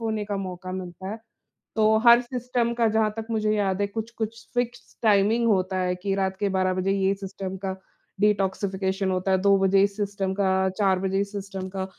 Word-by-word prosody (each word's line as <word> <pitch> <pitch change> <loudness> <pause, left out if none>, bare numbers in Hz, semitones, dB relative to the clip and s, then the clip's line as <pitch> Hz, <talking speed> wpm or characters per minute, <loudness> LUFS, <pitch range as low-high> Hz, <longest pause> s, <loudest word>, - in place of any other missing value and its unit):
होने 220 -2 -2
का 205 -1 -3
मौका 185 -1 -5
मिलता 185 0 -6
है। 220 - -5 0.6
तो 220 0 +4
हर 235 +1 +9
सिस्टम 245 -1 -2
का, 235 -1 +2
जहाँ 220 0 +2
तक 225 0 -5
मुझे 215 -1 +1
याद 195 -1 0
है, 200 - +1
कुछ-कुछ 225 +1 -5
फ़िक्स्ड 245 0 -3
टाइमिंग 215 +3 +3
होता 190 -3 +1
है 180 0 0
कि 195 +2 -2
रात 190 -1 -1
के 205 - +1
12 185 -1 +1
बजे 185 +1 0
ये 195 0 +2
सिस्टम 195 -1 -6
का 190 0 -2 0.4
डिटॉक्सिफिकेशन 195 -1 0
होता 185 +1 0
है, 190 - +4
2 200 0 +5
बजे 195 0 +4
इस 200 0 0
सिस्टम 200 -2 -2
का, 190 -1 +2
4 195 -3 +2
बजे 190 +1 0
इस 200 0 -2
सिस्टम 195 -2 -5
का। 190 0 -4
195 Hz, 200 wpm, -25 LUFS, 190-215 Hz, 0.6 s, हर